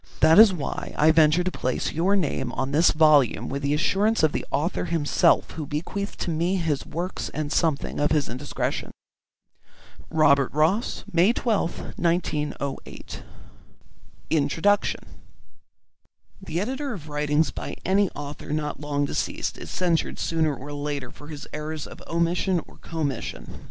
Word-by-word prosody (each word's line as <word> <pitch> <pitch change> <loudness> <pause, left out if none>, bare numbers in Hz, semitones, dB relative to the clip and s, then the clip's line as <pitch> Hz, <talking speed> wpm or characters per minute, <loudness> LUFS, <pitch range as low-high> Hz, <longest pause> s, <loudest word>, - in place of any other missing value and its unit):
That 160 +5 +7
is 220 -2 +9
why 160 -7 -5
I 155 +2 +5
venture 160 +2 +4
to 185 - -1
place 130 -6 -2
your 185 +5 +2
name 135 -8 -1
on 135 - -2
this 160 +4 +5
volume 155 -5 +4
with 140 +1 -3
the 140 +1 +1
assurance 200 +6 +2
of 155 - +5
the - - -2
author 165 +6 -1
himself 165 -4 +2
who 155 -3 -6
bequeathed 185 +8 -4
to 170 - -1
me 170 +4 0
his 160 -6 -1
works 175 +3 -4
and 150 -1 -3
something 160 -3 0
of 145 - +2
his 150 -3 +2
indiscretion. 130 +4 -3 1.2
ROBERT 140 -4 +4
ROSS 165 - +1
May 180 +7 +5
12th, 215 -8 -2
1908. 150 -5 -2 1.1
INTRODUCTION 165 +7 +2 1.4
The 170 -3 -3
editor 265 +6 -3
of 160 -7 -9
writings 150 +1 +1
by - - -6
any 195 +1 +3
author 145 +1 -7
not 150 -1 -2
long 145 -1 -1
deceased - - -3
is - - -8
censured 175 -3 0
sooner 160 -3 0
or 145 +3 -8
later 145 -3 -4
for 145 - -13
his 150 -2 -8
errors 150 0 -4
of - - -11
omission 170 +2 +1
or - - -17
commission. 150 -7 -5
155 Hz, 145 wpm, -25 LUFS, 145-175 Hz, 1.4 s, is